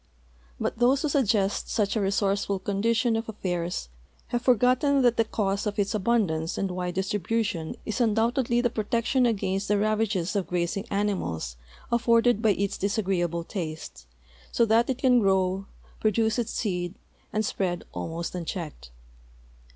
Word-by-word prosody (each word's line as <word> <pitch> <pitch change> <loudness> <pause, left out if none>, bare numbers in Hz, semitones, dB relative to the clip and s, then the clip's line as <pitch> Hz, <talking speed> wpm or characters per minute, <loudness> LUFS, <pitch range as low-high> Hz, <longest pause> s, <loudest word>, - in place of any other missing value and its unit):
But - - -2
those 260 +4 +3
who 305 - +1
suggest 210 -8 +1
such 205 -1 0
a 220 - +1
resourceful 200 0 +1
condition 225 +5 +1
of 225 0 -2
afiairs 180 - -3 0.4
have 240 - -1
forgot 250 0 +3
ten 280 -2 +3
that 240 -1 +4
the 225 - +3
cause 200 -2 -1
of 205 0 -3
its 200 0 0
al^undance 190 -7 0
and 195 -2 -1
wide 180 0 -3
distribution 195 -2 -1
is 220 +3 -2
undoubtedly 235 +2 +2
the 240 -2 +1
protection 235 +4 +1
against 195 -3 -1
the 210 - +2
ravages 215 -3 0
of 195 -3 0
grazing 180 +3 -1
ani 205 +1 +1
mals 80 - -4 0.4
afforded 235 -1 +3
by 220 - +3
its 200 0 -2
disagreeal)le 185 -5 -1
taste, 160 - -6 0.4
so 235 - +3
that 230 +2 +3
it 260 - 0
can 255 -2 +4
grow, 190 -1 +1 0.3
pro 215 - +3
duce 220 +2 +1
its 235 - -2
seed, 180 -4 -2 0.4
ami 215 - 0
spread 180 -4 -2
almost 165 +1 -4
unchecked. 165 - -5
205 Hz, 155 wpm, -26 LUFS, 185-230 Hz, 0.4 s, that